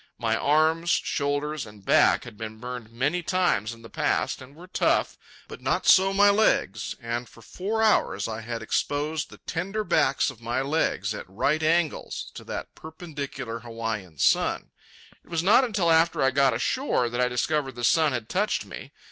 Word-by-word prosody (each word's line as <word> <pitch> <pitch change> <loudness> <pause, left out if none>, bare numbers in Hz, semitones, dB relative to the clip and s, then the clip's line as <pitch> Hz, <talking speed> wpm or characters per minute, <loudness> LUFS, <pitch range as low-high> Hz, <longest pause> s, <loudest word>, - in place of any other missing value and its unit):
My 110 -1 0
arms, 160 +5 +2
shoulders, 145 -2 0
and 105 -2 -15
back - - +4
had 120 - -11
been 110 0 -7
burned 125 -1 -7
many 140 +9 0
times 175 - +1
in 115 -1 -12
the - - -9
past - - -1
and 135 +2 -13
were 170 +3 -12
tough; 185 - +1 0.3
but - - -10
not - - 0
so 195 +1 +6
my 200 +1 +5
legs. 115 - +1
And 120 +1 -4
for 115 - -17
four 210 - -2
hours 220 - +2
I 110 0 -5
had 115 0 -5
exposed 150 +6 -1
the - - -13
tender 195 +6 -3
backs 145 -7 +2
of 120 -3 -17
my 120 +2 -2
legs, 150 +4 0
at - - -8
right 145 +11 0
angles, 160 0 0
to - - -9
that - - -6
perpendicular 145 -7 -7
Hawaiian 115 -7 -5
sun. - - +1 0.5
It - - -24
was 165 -1 -1
not 215 +8 +6
until 200 -9 +1
after 165 -2 +3
I 130 - +4
got 135 -3 +3
ashore 130 - 0
that 120 +1 -2
I 125 - +3
discovered 135 +2 -1
the 120 - -7
sun 155 +4 +4
had 120 -4 -3
touched 205 - 0
me. - - -10
140 Hz, 180 wpm, -26 LUFS, 115-165 Hz, 0.5 s, so